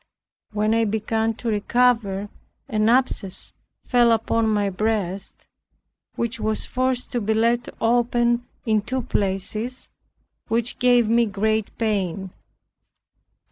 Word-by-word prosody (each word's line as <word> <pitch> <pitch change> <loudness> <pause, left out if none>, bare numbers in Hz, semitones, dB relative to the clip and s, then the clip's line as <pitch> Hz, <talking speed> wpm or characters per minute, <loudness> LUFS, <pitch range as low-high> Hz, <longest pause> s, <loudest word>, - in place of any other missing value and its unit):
When 215 +1 +1
I 230 0 +3
began 220 +1 0
to 235 - -4
recover, 210 -2 +1 0.4
an 215 0 +1
abscess 235 -6 0 0.3
fell 240 -2 +4
upon 225 0 +1
my 205 -2 +1
breast, 200 -2 -2 0.7
which 235 0 -2
was 215 0 0
forced 255 0 -1
to 245 -3 -1
be 220 +1 0
laid 235 +2 +1
open 240 +1 +2 0.2
in 215 -2 +2
two 255 +4 -3
places, 215 +5 -2 0.6
which 230 +1 -1
gave 245 -2 +4
me 230 +1 +3
great 215 +1 0
pain. 195 -4 -1
225 Hz, 115 wpm, -23 LUFS, 210-240 Hz, 0.7 s, fell